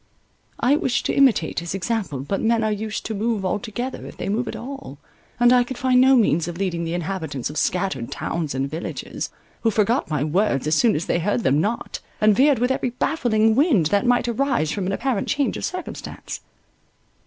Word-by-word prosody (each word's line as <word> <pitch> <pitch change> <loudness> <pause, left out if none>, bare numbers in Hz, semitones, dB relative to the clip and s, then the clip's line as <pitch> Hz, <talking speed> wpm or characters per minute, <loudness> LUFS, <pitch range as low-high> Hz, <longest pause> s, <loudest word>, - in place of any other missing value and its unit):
I 275 +4 +3
wished 265 -3 0
to - - 0
imitate 260 -12 +3
his 170 +2 -4
example, 195 - -2
but 195 +8 -2
men 225 0 +2
are 215 - +1
used 215 +1 -3
to 220 - -3
—move 215 -1 -1
all 185 +2 0
together, 240 +4 -5
if - - -11
they - - -4
move 225 +4 -1
at - - -4
all, 270 - -8 0.4
and 240 +1 +6
I 250 -1 +5
could 245 +1 -7
find 255 -2 +3
no 265 +1 +6
means 170 -9 +3
of 170 -1 -5
leading 175 -3 -1
the 165 +1 -2
inhabitants 160 -7 -3
of 150 - -7
scattered 180 -11 -1
towns 160 -5 -3
and 135 +1 -1
villages, 160 +5 -5 0.3
who 230 - +3
forgot 220 - +1
my 150 -3 0
words 155 -3 +1
as 155 - +1
soon 225 +7 +4
as 160 - -2
they - - 0
heard 205 +6 0
them 140 +3 +3
not, 220 +6 -2 0.2
and 215 -1 +4
veered 280 +4 +4
with 245 +3 +1
every 260 -1 0
baffling 235 -4 +1
wind, 260 - +3
that 205 +4 +2
might 245 0 +3
arise 240 - 0
from 195 -3 -2
an - - 0
apparent 235 0 -1
change 290 -2 0
of - - -3
circumstance. 365 -1 -6
215 Hz, 210 wpm, -22 LUFS, 170-245 Hz, 0.4 s, and